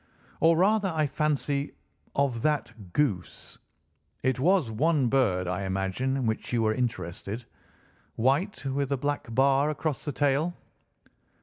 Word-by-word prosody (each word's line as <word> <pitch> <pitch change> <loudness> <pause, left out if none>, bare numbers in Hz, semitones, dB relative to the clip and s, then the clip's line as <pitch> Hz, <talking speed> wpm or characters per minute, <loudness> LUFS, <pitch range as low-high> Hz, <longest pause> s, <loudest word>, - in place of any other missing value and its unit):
"Or 165 0 +5
rather, 200 +2 +3
I 160 -3 +1
fancy, 145 -1 -1 0.4
of 135 -5 +1
that 115 -10 -2
goose. 105 -12 -2 0.6
It 130 0 +1
was 165 -4 +3
one 140 +2 +2
bird, 100 -9 +2
I 90 +2 -2
imagine 95 +8 -1
in 130 - -1
which 110 -1 -2
you 120 -2 +1
were 110 0 +2
interested—white, 120 - -3
with 135 0 -1
a 140 - +2
black 145 +1 -2
bar 140 +2 +4
across 155 -1 -2
the 145 - -2
tail." 145 +5 +1
135 Hz, 130 wpm, -27 LUFS, 115-150 Hz, 0.6 s, Or